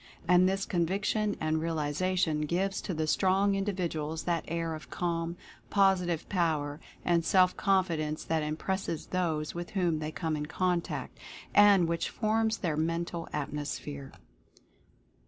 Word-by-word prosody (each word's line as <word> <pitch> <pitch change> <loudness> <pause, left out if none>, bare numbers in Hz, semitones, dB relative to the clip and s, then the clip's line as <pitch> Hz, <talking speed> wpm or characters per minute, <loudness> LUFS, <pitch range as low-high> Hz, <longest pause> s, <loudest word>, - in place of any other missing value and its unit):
And 180 +1 +5
this 195 +1 -1
conviction 200 +4 0
and 155 0 0
realization 160 +1 0
gives 195 +4 0
to 190 - -4
the 155 0 0
strong 190 +5 +3
individuals 170 -6 -2
that 170 -2 0
air 165 0 -2
of 155 -1 -8
calm, 170 -1 -2 0.3
positive 185 -4 +2
Power 155 -5 0 0.3
and 170 -1 +3
Self 185 +1 +4
Confidence 170 -6 +1
that 160 -1 0
im 155 0 -2
presses 190 -3 -2
those 160 -4 -1
with 175 0 -5
whom 170 -4 +1
they 155 0 -3
come 160 -1 -2
in 150 0 -3
contact 180 +2 -2 0.3
and 200 -4 +6
which 170 0 -1
forms 220 0 +1
their 165 -5 -1
Mental 165 +1 -2
Atmosphere. 145 -1 -4
170 Hz, 135 wpm, -30 LUFS, 155-185 Hz, 0.3 s, and